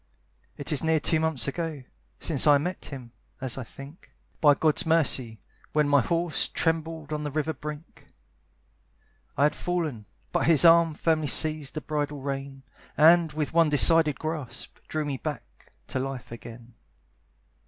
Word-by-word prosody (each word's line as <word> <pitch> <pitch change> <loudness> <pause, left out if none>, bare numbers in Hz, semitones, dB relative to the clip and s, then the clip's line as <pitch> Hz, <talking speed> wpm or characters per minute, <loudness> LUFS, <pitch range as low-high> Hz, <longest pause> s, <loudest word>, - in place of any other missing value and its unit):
It 145 - -4
is 150 - 0
near 160 0 +2
two 160 +1 +1
months 160 -4 0
ago 155 -1 -4 0.4
Since 155 -3 0
I 145 -1 +7
met 180 +6 -4
him, 125 -4 -9 0.3
as 130 -3 -2
I 130 - -5
think, 140 +7 -13 0.3
By 145 -2 +5
God's 155 +4 +1
mercy, 135 - +1 0.3
when 150 -1 +2
my 145 -1 +4
horse 170 +4 -1
Trembled 160 -2 -2
on 150 0 -3
the 150 - -3
river's 155 0 -2
brink. 150 +2 -9 1.3
I - - +3
had 150 - +3
fallen, 155 - -3 0.2
but - - 0
his 165 0 +5
arm 165 -1 +6
Firmly 155 -2 0
seized 155 0 +2
the 155 - -3
bridle 145 -1 -3
rein, 135 0 -6 0.3
And, 165 +1 +5
with 150 0 -3
one 165 -2 +4
decided 155 0 +4
grasp, 150 -6 -6
Drew 155 -1 -2
me 140 -2 -3
back 145 -4 -8 0.2
to - - -2
life 135 -2 -5
again. 115 0 -11
150 Hz, 155 wpm, -26 LUFS, 135-160 Hz, 1.3 s, I